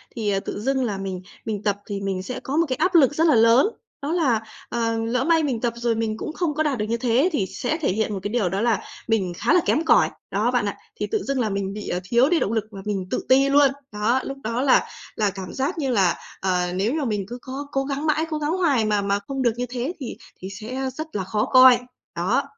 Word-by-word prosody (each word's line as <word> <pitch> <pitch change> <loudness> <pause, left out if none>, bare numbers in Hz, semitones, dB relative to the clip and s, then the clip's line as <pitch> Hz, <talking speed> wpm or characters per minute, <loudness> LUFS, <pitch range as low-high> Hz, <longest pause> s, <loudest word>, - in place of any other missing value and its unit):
thì, 215 -3 -1
ờ, 195 - +1
tự 195 - -5
dưng 265 +3 +1
là 210 -5 -2
mình 190 -2 -4 0.2
mình 210 -2 -3
tập 205 -2 +1
thì 200 -1 -4
mình 190 -1 -2
sẽ 250 +6 -5
có 275 +3 -3
một 335 - +4
cái 255 - 0
áp 360 +7 +1
lực 290 -4 +6
rất 325 +2 +3
là 300 - +5
lớn. 230 - +6 0.3
Đó 285 +2 -2
là, 275 -11 +2 0.3
ờ, 230 -1 0
lỡ 230 +3 0
may 325 +1 +3
mình 255 -6 -1
tập 240 -1 0
rồi 235 -1 0
mình 220 -1 -2
cũng 310 - -5
không 335 -3 -1
có 310 +2 0
đạt 290 -4 0
được 210 - -1
như 235 - +1
thế 250 +7 +2
thì 215 -11 0
sẽ 245 +9 -3
thể 315 - 0
hiện 215 +2 -1
một 195 - -3
cái 205 - -2
điều 220 -7 +1
đó 195 +3 -1
là 230 -3 +2 0.3
mình 200 -6 +1
khá - - +2
là - - +6
kém 320 - +1
cỏi - - +5 0.2
đó - - +1
bạn - - +1
ạ, - - -3 0.2
thì - - -1
tự 435 -3 -1
dưng 275 -1 -1
là 225 -3 +1
mình 195 -1 -2
bị, 210 0 -6
à, 180 - -1
thiếu 235 +8 +3
đi 345 -1 +3
động 200 - 0
lực 220 -2 +1
và 195 -2 -8
mình 195 -3 -2
tự - - -2
ti 270 +1 +5
luôn. 285 0 +6 0.2
Đó, 215 +5 +1
lúc 275 - -5
đó 230 +3 -1
là 270 - +4 0.3
là 210 -2 +1
cảm 190 -2 -7
giác 280 +7 -2
như 275 -5 -1
là, 190 -7 +3 0.3
ờ, 180 -2 0
nếu 205 +7 0
mà 305 -2 -1
mình 210 -5 -1
cứ 245 +3 -6
có 275 +2 -6
cố 270 - 0
gắng 280 +2 -3
mãi, 310 +1 +2
cố 310 - -2
gắng 300 +1 -1
hoài 285 -11 +2
mà 210 -1 +1
mà 200 0 0
không 270 -1 -3
được 240 -2 +3
như 245 +1 -2
thế 255 +6 -3
thì 260 - -6 0.2
thì 190 - -7
sẽ 240 +7 -4
rất 315 +4 -5
là 195 - -1
khó 210 +3 -1
coi. 255 -1 +7 0.4
Đó. 195 +11 +1
235 Hz, 275 wpm, -23 LUFS, 205-275 Hz, 0.4 s, coi